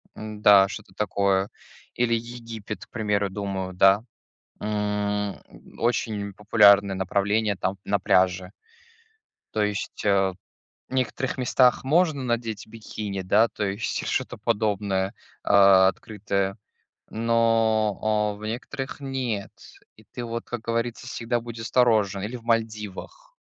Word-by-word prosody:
М-да, 105 -2 +4
что-то 105 -1 -9
такое. 100 -2 +1 0.5
Или 120 -1 +1
Египет, 115 -2 -7
к - - -44
примеру, 105 -3 -1
думаю, 95 -2 -4
да. 95 +3 +5 0.6
М, 105 -1 -2 0.4
очень 110 -4 -1
популярное 100 -1 +5
направление, 100 +3 0
там, 95 +1 -2
на 100 0 +1
пляже. 90 +1 +2 1.0
То 110 - 0
есть, 105 0 -3
э, 105 - +2 0.8
в - - -9
некоторых 130 +1 -1
местах 125 0 +3
можно 155 0 +2
надеть 115 -3 -2
бикини, 105 -3 -6
да, 105 +5 +3
то 105 - -3
есть, 100 +3 -3
что-то 125 -1 -2
подобное, 105 -3 0 0.3
а, 100 -2 +6
открытое, 100 0 -3 0.5
но, 115 -2 +2
о, 105 -1 +1
в 105 - -11
некоторых 130 +5 -5
нет, 130 -7 -3 0.5
и 110 - -19
ты, 120 - -8
вот, 115 0 -4
как 120 - -5
говорится, 115 +1 -3
всегда 120 -1 -2
будь 115 0 -8
осторожен. 110 -4 +2
Или 110 +5 -4
в 115 - -13
Мальдивах 115 - -3
105 Hz, 125 wpm, -25 LUFS, 100-115 Hz, 1.0 s, а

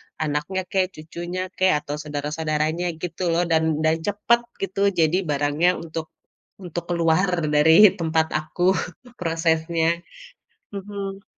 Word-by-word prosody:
anaknya 155 +5 -2
kek, 190 -1 +2
cucunya 175 +3 -6 0.2
kek, 185 0 +4
atau 145 - -4
saudara-saudaranya 155 +2 -2 0.2
gitu 180 +1 -4
loh. 175 +2 +2
Dan 160 0 +3 0.2
dan 160 0 +3
cepet 210 +4 +2 0.2
gitu 195 0 -3 0.2
jadi 160 +3 +3
barangnya 145 +4 +2
untuk 160 -1 -5 0.5
untuk 175 -2 -5
keluar 170 +2 +2 0.3
dari 160 +7 +7
tempat 160 -1 +1
aku 155 +3 -3 0.6
prosesnya. 165 0 0 0.7
Mhm. 195 0 -6
165 Hz, 115 wpm, -23 LUFS, 155-185 Hz, 0.7 s, dari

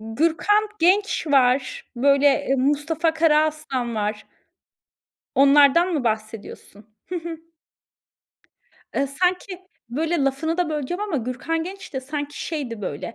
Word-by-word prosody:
Gürkan 330 - +1
Genç 380 +1 +2
var, 275 - +2
böyle 280 +1 +3
Mustafa 300 +4 +1
Karaaslan 305 -6 +1
var. 210 0 -3 1.1
Onlardan 285 +5 +5
mı 285 -6 -1
bahsediyorsun? 215 -1 -5
Hı 360 - -3
hı. 335 -1 -6 1.6
Iıı, 275 - +1
sanki 360 +5 -1 0.3
böyle 320 +6 -1
lafını 320 +5 -1
da 355 -3 +1
böleceğim 305 +5 -3
ama 415 -7 -2
Gürkan 260 +7 -2
Genç 380 0 -9
de 265 - -3
sanki 290 +2 -5
şeydi 250 -10 -5
böyle, 165 +8 -5
290 Hz, 115 wpm, -23 LUFS, 255-335 Hz, 1.6 s, Onlardan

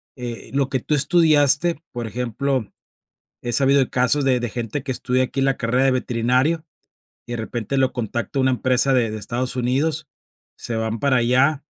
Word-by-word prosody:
eh, 120 -2 -7
lo 135 -1 +1
que 130 - -1
tú 150 - -1
estudiaste, 150 0 +3
por 120 -2 -5
ejemplo, 125 +1 -2 0.7
he 120 - -3
sabido 135 +3 +4
de 130 - +1
casos 130 +3 +2
de 130 -2 +3
de 120 -2 -3
gente, 120 +3 -4
que 135 - -3
estudia 130 0 0
aquí 130 +1 -4
en 135 - +2
la 135 -1 +1
carrera 125 +3 +1
de 135 - +4
veterinario, 130 +6 0 0.6
y 120 - -7
de 120 - -2
repente 115 +3 -3
lo 130 -1 +2
contacto 120 +3 -3
una 130 0 +3
empresa 130 +2 +2
de 120 -4 +2
de 110 - -5
Estados 125 +4 -3
Unidos, 140 +5 0 0.5
se 115 - -5
van 110 0 -2
para 140 0 +2
allá, 130 +5 +2
130 Hz, 190 wpm, -21 LUFS, 120-140 Hz, 0.7 s, sabido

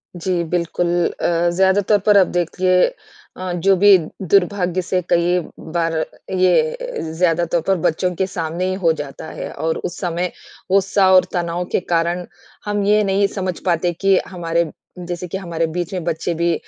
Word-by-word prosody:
जी 175 0 -1
बिल्कुल, 175 +1 -1 0.3
अ 170 0 +2
ज़्यादातर 190 +2 +3
पर 210 -1 +6
अब 185 - +5
देखिए 180 +1 +2 0.5
अ, 185 -1 -4
जो 190 +3 +3
भी 200 0 +7 0.2
दुर्भाग्य 185 0 +1
से 180 +1 -1
कई 175 +1 +3 0.3
बार 165 -1 0 0.4
ये 475 - +1
ज़्यादातर 170 0 +1
पर 195 - +3
बच्चों 180 +3 +1
के 190 +1 0
सामने 170 0 -3
ही - - -1
हो 165 - +6
जाता 145 -1 -7
है। - - -6
और 160 0 -2
उस 175 - -5
समय 175 0 -2 0.4
गुस्सा 195 0 +3
और 185 -1 +6
तनाव 175 0 -1
के - - +2
कारण 175 0 -1 0.4
हम 205 -1 -1
ये 210 +1 +4
नहीं 200 0 +2
समझ 185 -2 -2
पाते 175 0 +1
कि 195 -1 +4
हमारे 170 -2 -1 0.4
जैसे 180 0 -4
कि 190 - -4
हमारे 170 -3 -2
बीच 175 +1 -3
में 180 -3 -3
बच्चे 170 0 -2
भी 170 +1 +1
180 Hz, 165 wpm, -19 LUFS, 170-190 Hz, 0.5 s, भी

